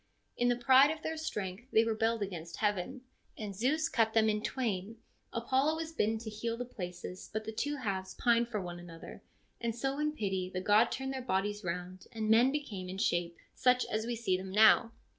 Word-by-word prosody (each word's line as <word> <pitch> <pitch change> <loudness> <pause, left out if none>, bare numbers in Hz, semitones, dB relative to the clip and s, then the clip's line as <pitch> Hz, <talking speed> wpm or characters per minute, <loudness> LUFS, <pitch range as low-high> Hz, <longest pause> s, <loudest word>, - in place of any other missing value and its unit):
In 245 - +1
the 245 - +3
pride 260 +3 +6
of 315 0 -4
.jeir 320 - -2
strength 220 -7 -5
they 220 - +5
rebelled 225 0 0
against 170 -4 -6
heaven, 210 +4 -1 0.4
and 205 -3 -5
Zeus 290 +10 +1
cut 225 -7 +1
them 220 -1 +5
in 210 0 0
twain. 225 -3 -2 0.3
Apollo 265 +6 +1
was 320 0 -4
bidden 225 -8 +1
to 220 0 -6
heal 230 +2 -3
the 245 - -4
places, 180 -4 -7
but 215 0 -3
the 220 - -4
two 290 +6 -2
halves 195 -8 -3
pined 235 -1 +3
one 185 -5 -3
for - - -11
the - - -10
other, 165 - -10 0.4
and 230 -1 -1
so 270 +4 -2
in 300 0 0
pity 190 -8 -2
the 185 - -3
god 210 +5 +4
turned 265 0 -3
their 260 - -4
bodies 205 -3 -1
round, 180 +1 -5
and 220 -1 -1
men 240 +4 +6
became 210 -11 -4
in 190 - -5
shape 175 -3 0 0.2
such 250 -1 +3
as 220 +1 -1
we 240 - -1
see 220 -5 0
them 190 +1 -5
now. 220 +3 +6
220 Hz, 210 wpm, -32 LUFS, 190-250 Hz, 0.4 s, pride